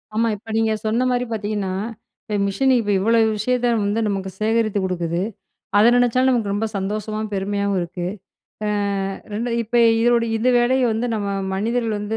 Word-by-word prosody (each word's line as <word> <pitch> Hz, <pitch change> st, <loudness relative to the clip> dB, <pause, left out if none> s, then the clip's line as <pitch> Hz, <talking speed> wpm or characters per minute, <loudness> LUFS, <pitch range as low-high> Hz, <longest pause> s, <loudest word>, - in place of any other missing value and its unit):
ஆமா. 230 Hz, +1 st, +2 dB
இப்ப 220 Hz, +2 st, -11 dB
நீங்க 225 Hz, 0 st, +2 dB
சொன்னமாரி 245 Hz, +3 st, +1 dB
பார்த்தீங்கன்னா, 205 Hz, -3 st, -2 dB, 0.5 s
இப்ப 210 Hz, -, -4 dB
மிஷினு 265 Hz, +7 st, +2 dB
இப்ப 205 Hz, -2 st, -1 dB
இவ்ளோ 230 Hz, +4 st, +3 dB, 0.2 s
விஷயத்த 245 Hz, +3 st, +1 dB
வந்து 205 Hz, +2 st, 0 dB
நமக்கு 195 Hz, -2 st, -2 dB
சேகரித்து 215 Hz, -1 st, +1 dB
குடுக்குது. 175 Hz, -2 st, -2 dB, 0.6 s
அத 210 Hz, -, +6 dB
நினைச்சாலும் 245 Hz, +2 st, +3 dB
நமக்கு 225 Hz, -5 st, 0 dB
ரொம்ப 215 Hz, +2 st, -1 dB
சந்தோஷமாவும், 215 Hz, +2 st, -3 dB
பெருமையாவும் 200 Hz, 0 st, -1 dB
இருக்கு. 175 Hz, +1 st, -4 dB, 0.6 s
அ -, -, 0 dB, 0.6 s
2 230 Hz, +4 st, -2 dB
இப்ப 230 Hz, +2 st, -2 dB, 0.2 s
இதனுடைய 235 Hz, -1 st, +2 dB
இந்த 235 Hz, +3 st, +1 dB
வேலைய 255 Hz, +2 st, +2 dB
வந்து 225 Hz, +3 st, -1 dB
நம்ம 205 Hz, -2 st, -2 dB, 0.3 s
மனிதர்கள் 225 Hz, +2 st, -1 dB
வந்து 210 Hz, +2 st, -3 dB
215 Hz, 155 wpm, -21 LUFS, 200-235 Hz, 0.6 s, அத